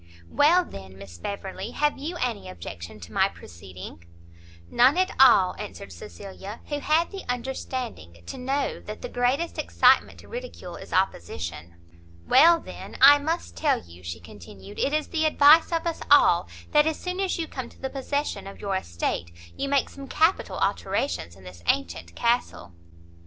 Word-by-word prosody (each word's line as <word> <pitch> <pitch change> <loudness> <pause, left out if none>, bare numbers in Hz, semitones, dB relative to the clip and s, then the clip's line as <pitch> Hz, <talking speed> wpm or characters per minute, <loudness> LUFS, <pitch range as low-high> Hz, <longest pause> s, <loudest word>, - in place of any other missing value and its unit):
"Well, 345 +5 +4
then, 95 -1 -11
Miss 95 -3 -12
Beverley, 195 - -5
have 295 0 +1
you 330 +5 -4
any 240 -7 -3
objection 85 +2 -9
to 85 - -11
my - - +3
proceeding?" 90 0 -11 0.6
"None 255 - +4
at 370 0 +2
all!" 205 -9 +6
answered 205 -1 -8
Cecilia, 200 0 -9
who 290 -1 -2
had 315 +4 +1
the 390 -1 -7
understanding 245 - -5
to - - -7
know 270 +3 -1
that - - -9
the - - -4
greatest 260 +7 0
excitement - - +3
to - - -16
ridicule - - -8
is - - -11
opposition. 85 - -2 0.5
"Well, 335 +1 +7
then, - - -10
I 285 +2 +9
must 320 +4 -3
tell 300 -3 +1
you," 85 +1 -15
she 85 -1 -6
continued, 95 +3 -12
"it 280 - +1
is 305 0 -1
the 315 -1 0
advice 305 +2 +6
of 330 0 -1
us 335 -1 -2
all, - - +6 0.2
that 300 0 +5
as 320 - -1
soon 365 +1 -4
as 385 -1 0
you 330 -2 -3
come 255 -5 -6
to - - -20
the 265 - -4
possession 285 -4 -3
of 195 - -10
your 200 -1 -2
estate, 85 - -3 0.2
you 275 - -3
make 280 -1 +2
some 275 -1 -10
capital 325 +6 +1
alterations 85 - -1
in 95 - -17
this 90 -1 -12
antient 85 -2 -1
castle." 235 - -1
245 Hz, 170 wpm, -25 LUFS, -, 0.6 s, I